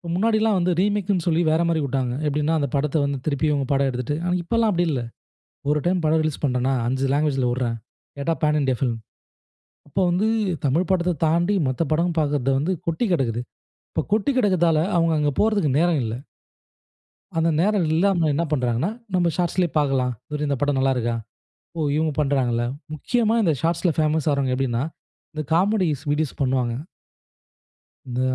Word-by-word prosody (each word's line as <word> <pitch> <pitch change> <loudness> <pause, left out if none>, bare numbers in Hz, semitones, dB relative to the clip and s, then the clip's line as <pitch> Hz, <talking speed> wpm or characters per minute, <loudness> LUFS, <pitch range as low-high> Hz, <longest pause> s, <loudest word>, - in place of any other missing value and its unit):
முன்னாடில்லாம் 215 +1 +2
வந்து 180 +1 +1
ரீமேக்னு 200 -2 0
சொல்லி 170 0 +2
வேற 160 +2 +2
மாதிரி 165 -2 +1
விட்டாங்க. 130 -2 -1
எப்டீன்னா, 150 +2 0
அந்த 140 - -1
படத்த 150 +2 0
வந்து 140 -1 -2
திருப்பி 155 +1 0
இவங்க 140 -3 0
படம் 135 0 +2
எடுத்துட்டு. 125 +4 -3
ஆனா 180 - +1
இப்போதெல்லா 230 +5 +1
அப்டி 175 0 +1
இல்ல. 130 -4 -1 0.7
ஒரு 150 - +2
டைம் 175 -1 +1
படம் 160 +1 +3
ரிலீஸ் 155 -2 -3
பண்ணுறேனா 130 -1 +1
5 130 +2 -1
லாங்குவேஜ்ல 140 -4 +1
விடுறேன். 120 -2 -1 0.4
கேட்டா 140 +4 0
பேன் 150 0 +2
இண்டியா 130 -3 0
ஃபிலிம். 120 -4 -1 0.9
அப்போ 145 - -2
வந்து 185 +5 +1 0.4
தமிழ் 160 +6 +1
படத்த 180 -1 +2
தாண்டி 170 +5 +2
மத்த 130 +5 -1
படம் 170 +2 +1
பாக்குறது 145 -3 +1
வந்து 160 +7 0
கொட்டி 165 +8 0
கிடக்குது. 120 -7 0 0.5
இப்போ - - 0
கொட்டிக் 225 +6 +1
கிடக்குறதால 175 -8 +3 0.2
அவங்க 165 -1 +3
அங்கே 145 -1 +1
போறதுக்கு 210 -8 +2
நேரம் 170 -3 +2
இல்ல. 110 -1 -3 1.2
அந்த 165 +1 +2
நேரம் 200 -3 +2
இல்லாம 175 -1 +2
என்ன 170 - 0
பண்ணுறாங்கன்னா, 125 - 0 0.2
நம்ப 175 -2 +3
ஷார்ட்ஸ்லேயே 175 0 0
பாக்கலாம். 135 -4 +1 0.3
இந்த 140 - 0
படம் 145 -1 +1
நல்லா 135 0 +2
இருக்கா? 120 -1 -1 0.6
ஓ! - - -1 0.2
இவங்க 155 -1 +1
பண்ணுறாங்களா? 125 -5 +1 0.3
நிச்சயமா 230 - +1
இந்த 165 -6 +2
ஷார்ட்ஸ்ல 170 +1 +1
பேமஸ் 155 0 +1
ஆகுறவங்க 140 -3 0
எப்டீன்னா, 125 -2 -1 0.5
இந்த 155 - -2
காமெடி 190 +1 +2 0.2
வீடியோஸ் 150 -1 -1
பண்ணுவாங்க. 130 -3 +1 1.3
இந்த 125 0 -3
155 Hz, 160 wpm, -23 LUFS, 135-175 Hz, 1.3 s, படம்